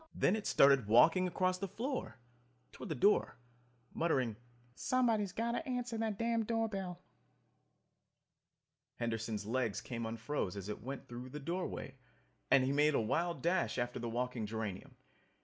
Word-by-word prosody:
Then 195 - +3
it 215 - -3
started 135 -5 +5
walking 165 - +6
across 185 +1 0
the 195 - -2
floor, 245 - -4 0.5
toward - - -8
the 155 - -1
door, 205 +11 +3 0.6
muttering, 130 -9 +1 0.4
"Somebody's 225 - +1
got 230 +4 -1
to 240 - -2
answer 245 -2 -2
that 220 -3 -1
damned 230 -1 0
door 225 -1 +1
bell." 185 -4 -5 1.9
Henderson's 115 -3 -2
legs 115 -1 0
came 115 -2 -4
unfroze 115 -3 -3
as 100 0 -6
it 105 - -5
went 135 +2 -6
through 120 +1 -7
the 150 - -6
doorway 170 +6 -4 0.6
and 135 -1 +6
he 130 - +1
made 150 +1 +3
a - - +3
wild 170 +10 -1
dash 175 -3 +1
after 120 0 -2
the 120 0 -3
walking 120 -1 -2
geranium. 105 -3 -5
145 Hz, 150 wpm, -35 LUFS, 120-200 Hz, 1.9 s, walking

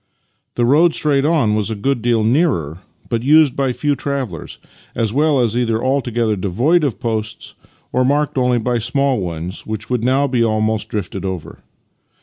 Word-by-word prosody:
The 120 - +1
road 155 +7 +4
straight 140 -2 +1
on 150 -9 +2
was 105 0 0
a 110 - -2
good 125 +4 -1
deal 115 -1 +1
nearer, 110 - +1 0.3
but 115 -2 -1
used 145 +1 +4
by 135 -2 0
few 145 +3 -1
travellers, 135 - -4 0.4
as 110 -2 -1
well 150 0 +2
as 120 -2 +1
either 115 -2 0
altogether 120 -4 0
devoid 120 - +1
of 140 -6 -1
posts 110 -2 -4 0.4
or 130 - +2
marked 145 +3 +1
only 125 -2 +2
by 120 +1 0
small 130 +2 0
ones 85 0 -5
which 110 +2 -5
would 125 -2 0
now 135 +3 +2
be 125 -4 +1
almost 110 -1 0
drifted 100 -4 -4
over. 95 -4 -5
120 Hz, 170 wpm, -18 LUFS, 110-140 Hz, 0.4 s, road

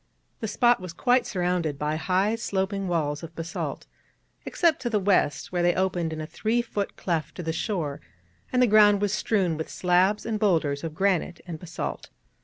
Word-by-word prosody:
The 220 - -3
spot 240 +2 +3
was 180 -2 -7
quite 250 +7 +2
surrounded 175 -5 -1
by 150 +1 -1
high 190 +6 +1
sloping 195 -3 -2
walls 150 -4 -1
of 165 -1 -9
basalt, 165 +1 -4 0.6
except 335 -5 +2
to 240 - -1
the 215 -3 +1
west, 190 -6 +1
where 175 -1 0
they 175 0 +3
opened 180 -3 0
in 160 - -5
a 155 - -4
three 225 +8 -1
foot 205 -3 -4
cleft 165 -4 -2
to 180 - -6
the 160 0 -2
shore, 165 -7 -2 0.5
and 250 0 +3
the - - +7
ground 210 -2 +6
was 205 0 0
strewn 190 -6 +1
with 160 - -5
slabs 185 +3 +2
and 220 -2 -2
boulders 160 -8 +1
of 160 -2 -5
granite 185 -1 0
and 165 -3 -6
basalt. 165 0 -5
185 Hz, 190 wpm, -26 LUFS, 165-210 Hz, 0.6 s, the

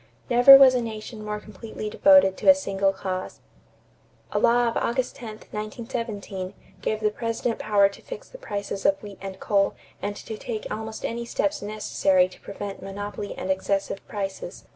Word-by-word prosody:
Never 245 +3 +10
was 270 -2 +8
a 250 - +1
nation 220 -1 -6
more 210 0 -3
completely 215 +1 -8
devoted 280 -3 +5
to - - +3
a 285 - +10
single 195 -8 0
cause. 185 -1 -5 0.9
A - - +1
law 240 0 +4
of 230 - -1
August 255 +1 -1
10, 240 - -8 0.2
1917, 210 -3 -5 0.3
gave 215 0 -1
the 210 -1 +2
President 230 +1 -2
power 205 -2 +4
to 200 - -14
fix - - -9
the - - -13
prices 200 - -4
of 195 - +3
wheat 205 -2 -10
and 190 -1 -7
coal 200 -2 +1 0.3
and 205 0 -3
to 220 0 -8
take 220 -3 -5
almost 220 +1 -5
any 235 +1 -3
steps 295 +5 -1
necessary 200 -3 +2
to - - -16
prevent 200 0 -7
monopoly 205 +1 -6
and 190 - -2
excessive 195 +1 -1
prices. 195 -3 -5
210 Hz, 170 wpm, -25 LUFS, 195-235 Hz, 0.9 s, Never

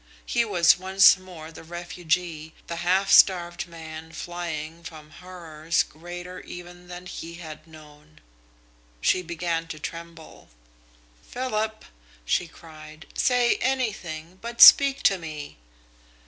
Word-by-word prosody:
He 235 - +1
was 180 -6 +4
once 190 +1 +6
more 170 -4 -11
the 165 - -12
refugee, 170 -1 -3
the 170 - -6
half 185 +3 +1
starved 175 -2 +4
man 160 -1 -10
flying 170 -1 -6
from 155 -2 -11
horrors 165 -2 -3
greater 175 +3 -9
even 175 0 -11
than 180 0 -9
he 170 -2 -8
had 160 -2 -10
known. 155 -1 -17 0.8
She 185 - +2
began 170 -1 -3
to 160 - -7
tremble. 165 +1 -10 0.7
"Philip!" 220 -4 -3 0.4
she 175 - 0
cried. 155 -1 -14
"Say 250 -1 +2
anything, 190 -10 -3
but 235 0 -7
speak 275 -1 +9
to 195 -1 +3
me!" 150 - -8
170 Hz, 120 wpm, -25 LUFS, 160-185 Hz, 0.8 s, speak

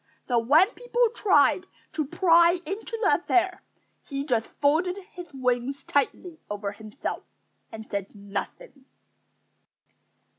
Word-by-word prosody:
So 245 -2 +3
when 295 +11 +5
people 485 -1 +1
tried 375 -3 +3 0.3
to 310 -1 -1
pry 340 +1 +5
into 410 +6 -4
the - - +3
affair, 365 0 +1 0.4
he 275 -1 -4
just 235 -6 0
folded 330 +6 +2 0.2
his 355 -3 -9
wings 255 0 -1
tightly 320 +4 -1
over 205 -1 -3
himself 215 +5 -6 0.5
and 220 0 -9
said 200 +1 -5
nothing. 205 - -7
290 Hz, 115 wpm, -26 LUFS, 235-360 Hz, 0.5 s, when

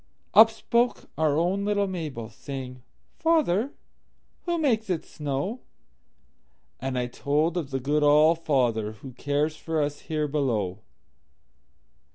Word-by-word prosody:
Up 220 +1 +9
spoke 235 +2 0
our 155 -2 +2
own 180 +4 +1
little 205 0 +1
Mabel, 155 - -5
Saying, 125 +2 -8 0.4
"Father, 285 - +2 0.7
who 345 -1 0
makes 230 -9 +1
it 175 -4 -1
snow?"And 150 - -3 1.4
I 125 - 0
told 150 +6 0
of 165 -6 -2
the 135 -1 -2
good 145 +4 +1
All 150 +3 +6
fatherWho 120 -6 -1
cares 145 +3 0
for 160 -1 -2
us 145 0 -1
here 155 -1 -2
below. 115 -10 -1
150 Hz, 120 wpm, -26 LUFS, 135-190 Hz, 1.4 s, Up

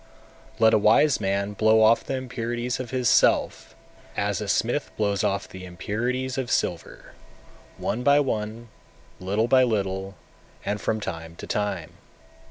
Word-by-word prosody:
239. 110 - +3
Let 110 - +6
a - - +6
wise 120 +7 +4
man 100 +1 -1
blow 110 +1 +4
off 110 +2 +4
the 135 - -3
impurities 120 -1 -3
of 125 -2 -5
his 125 -1 -1
self, - - +2 0.4
as - - -1
a - - -4
smith - - 0
blows 100 -2 0
off 100 -1 -1
the 95 0 -10
impurities 120 +9 -3
of 125 -3 -3
silver - - -2 0.7
one 115 - -2
by 140 +2 +5
one, 115 -3 -3 0.5
little 100 +5 0
by 130 +1 +5
little, 95 -5 -1 0.5
and 105 0 -2
from 110 - -1
time 85 -4 -6
to - - -9
time. 95 -6 -2
110 Hz, 155 wpm, -25 LUFS, 100-125 Hz, 0.7 s, Let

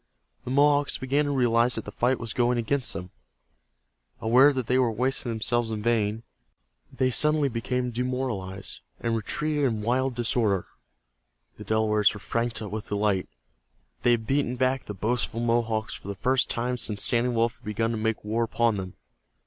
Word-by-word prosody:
The - - -5
Mohawks 145 +1 +3
began 140 +3 +1
to - - -1
realize 120 -2 +3
that 110 - -4
the 105 - -7
fight 125 +4 +1
was 115 -2 -4
going 120 0 +2
against 125 +2 0
them. 90 0 -7 1.1
Aware 125 +6 +6
that 130 -3 -2
they 125 +2 +2
were 125 -3 +3
wasting 125 +2 0
themselves 115 +1 0
in 110 -1 -4
vain, 110 -1 +1 0.7
they 130 0 0
suddenly 150 +2 +3
became 125 +1 -2
demoralized, 120 -6 -3 0.2
and 115 -1 -1
retreated 150 +7 -1
in 110 -5 -1
wild 130 +2 0
disorder. 115 -5 +1 0.9
The - - -8
Delawares 110 -1 +2
were - - -7
frantic 115 -1 -3
with 105 0 -5
delight. 100 -2 0 0.7
They - - +3
had 115 -2 +2
beaten 135 -1 0
back 130 +1 0
the 105 - -6
boastful 115 +3 -1
Mohawks 115 -2 0
for - - -10
the 100 - -4
first 130 +7 +1
time 125 +1 -1
since 105 -3 -3
Standing 120 0 +1
Wolf 115 0 +1
had - - -23
begun 115 +2 -1
to 115 - -2
make 110 -1 -2
war 110 +2 0
upon 115 -1 +1
them. 95 -1 -6
115 Hz, 175 wpm, -26 LUFS, 110-125 Hz, 1.1 s, Aware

